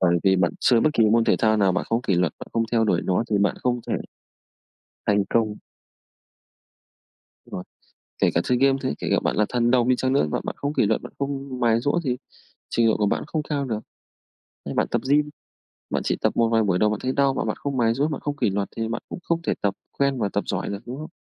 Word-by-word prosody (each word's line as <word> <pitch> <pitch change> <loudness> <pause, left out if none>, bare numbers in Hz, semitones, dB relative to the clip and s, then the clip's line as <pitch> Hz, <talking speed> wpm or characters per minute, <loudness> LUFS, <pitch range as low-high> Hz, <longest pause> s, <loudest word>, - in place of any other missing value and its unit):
Bởi 85 -1 +3
vì 95 -1 +5
bạn 90 -2 +2
chơi 120 -2 +4
bất 155 - +3
kỳ 115 - +3
môn 115 0 +4
thể - - +3
thao 110 0 +3
nào 100 -3 +3
bạn - - -1
không 115 - +2
có - - -14
kỷ 95 - +3
luật, 85 -2 +1
bạn - - -8
không 115 - +1
theo 115 -1 +3
đuổi 90 -5 +2
nó 95 +5 +1
thì 105 - +2
bạn 100 0 +2
không 125 -1 +1
thể - - 0 1.1
thành 100 -1 +3
công. 110 -2 +1 1.9
Rồi, 90 - -7 0.6
kể - - +4
cả 85 - +4
chơi 125 - +1
game 135 +1 +4
thế, 130 - 0
kể - - -4
cả - - +4
bạn - - 0
là 105 - +3
thần 120 -1 +1
đồng 125 -2 +3
đi 130 - +5
chăng 130 +1 0
nữa, 135 - +3
mà - - -1
bạn - - -4
không 145 +1 -2
kỷ 115 - +2
luật, 110 +1 +1
bạn - - -10
không 140 -2 -4
mài 115 -2 +3
giũa 145 +7 +1
thì 125 -4 -1 0.5
trình 115 -1 +2
độ 110 - +2
của 105 - +1
bạn 100 - 0
không 155 -1 -2
cao 145 -2 -2
được. 110 -4 -2 0.9
Như - - -4
bạn - - +1
tập - - -1
gym, 150 +1 +3 0.6
bạn - - -1
chỉ - - 0
tập - - 0
một 115 -1 +3
vài 115 0 +3
buổi 95 -4 +1
đầu 105 +1 +3
bạn 105 - -2
thấy 130 - 0
đau 140 0 +2
mà - - -1
bạn 110 - -2
không 140 -2 -4
mài 115 -2 +2
giũa, 140 +5 +1
bạn 150 - -4
không 145 -1 -3
kỷ 105 - +1
luật 100 +1 -1
thì 115 0 -2
bạn 115 - -4
cũng - - -6
không 170 0 -1
thể - - 0
tập 100 -1 0 0.2
quen 140 -2 +2
và 105 - 0
tập 100 - -1
giỏi 90 -3 -2
được, 100 0 -4
đúng 125 - -5
không? 155 - -7
115 Hz, 265 wpm, -24 LUFS, 105-135 Hz, 1.9 s, vì